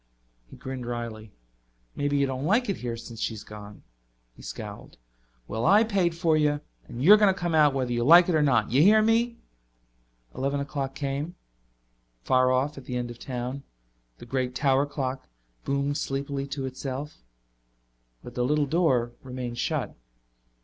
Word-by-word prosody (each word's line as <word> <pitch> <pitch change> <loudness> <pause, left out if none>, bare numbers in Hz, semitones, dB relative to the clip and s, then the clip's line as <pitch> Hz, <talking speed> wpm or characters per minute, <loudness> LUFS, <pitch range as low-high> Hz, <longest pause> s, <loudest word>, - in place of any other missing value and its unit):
He - - -12
grinned 130 -2 -6
wryly. 115 -3 -5 0.6
"Maybe 145 0 0
you 140 - +3
don't 130 0 -3
like 215 +9 +2
it 195 - -1
here 120 -1 -4
since 115 -1 -10
she's 110 -2 -3
gone." 105 -1 -11 0.5
He - - -15
scowled. - - -8 0.5
"Well, 110 +1 -3
I 205 +6 +6
paid 190 -6 +1
for 165 -2 +2
you, 150 -1 +1 0.3
and 120 +2 -6
you're 205 +6 +8
coming 175 -3 -2
out 145 -2 +5
whether 125 -2 -1
you 120 0 0
like 170 +6 +8
it 180 - +1
or 155 - +3
not. 125 -8 +2
You 130 +4 +4
hear 215 +5 +6
me?" 230 +1 +2 1.0
Eleven 140 +2 -1
o'clock 140 -1 -4
came. 140 +5 -3 0.9
Far 130 - +3
off, 135 +3 0
at 135 - -14
the 125 - -3
end 120 -1 -3
of 120 - -12
town, 125 +1 -5 0.6
the - - -11
great 125 0 -2
tower 140 0 +2
clock 135 -2 -4 0.4
boomed 140 +1 -1
sleepily 140 0 -3
to 140 -1 -4
itself. 130 - -6 1.0
But 120 - -10
the 125 - -1
little 150 +3 +2
door 135 -7 +1
remained 125 -2 -6
shut. - - -2
135 Hz, 165 wpm, -26 LUFS, 125-150 Hz, 1.0 s, you're